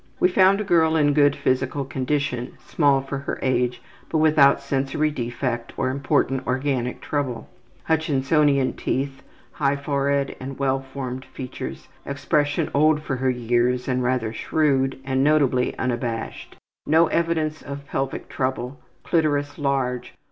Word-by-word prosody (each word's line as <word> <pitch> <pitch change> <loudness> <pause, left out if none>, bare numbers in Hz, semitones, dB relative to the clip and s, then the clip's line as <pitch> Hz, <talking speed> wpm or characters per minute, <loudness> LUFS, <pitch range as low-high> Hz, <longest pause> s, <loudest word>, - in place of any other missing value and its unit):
We 180 - +4
found 190 +2 +4
a - - -1
girl 165 -4 +3
in 145 -2 +3
good 145 -1 +4
physical 130 +2 0
condition, 130 -2 -2
small 140 -4 +3
for 135 0 -5
her 140 - -4
age, 125 -1 0 0.3
but 160 - 0
without 150 -3 +5
sensory 140 +2 -1
defect 120 -2 -3
or 130 -1 0
important 140 -1 0
organic 130 -1 -1
trouble. 130 -6 -3 0.4
Hutchinsonian 145 -3 +2
teeth. 135 0 -2 0.3
High 140 -1 +1
forehead 140 0 -1
and 135 +1 -7
well 135 -1 +1
formed 130 -1 -6
features. 130 -2 -7 0.2
Expression 145 +1 0
old 150 +1 +3
for 135 -3 -2
her 130 +1 +1
years 125 0 +1
and 125 -1 0
rather 125 -3 0
shrewd, 135 0 +1
and 135 0 +1
notably 140 -4 +2
unabashed. 120 -2 -3 0.3
No 160 +2 +5
evidence 160 -2 0
of 140 0 -7
pelvic 135 -1 -3
trouble. 130 0 -3 0.2
Clitoris 145 -3 0
large. 135 -3 -1
140 Hz, 135 wpm, -23 LUFS, 130-145 Hz, 0.4 s, without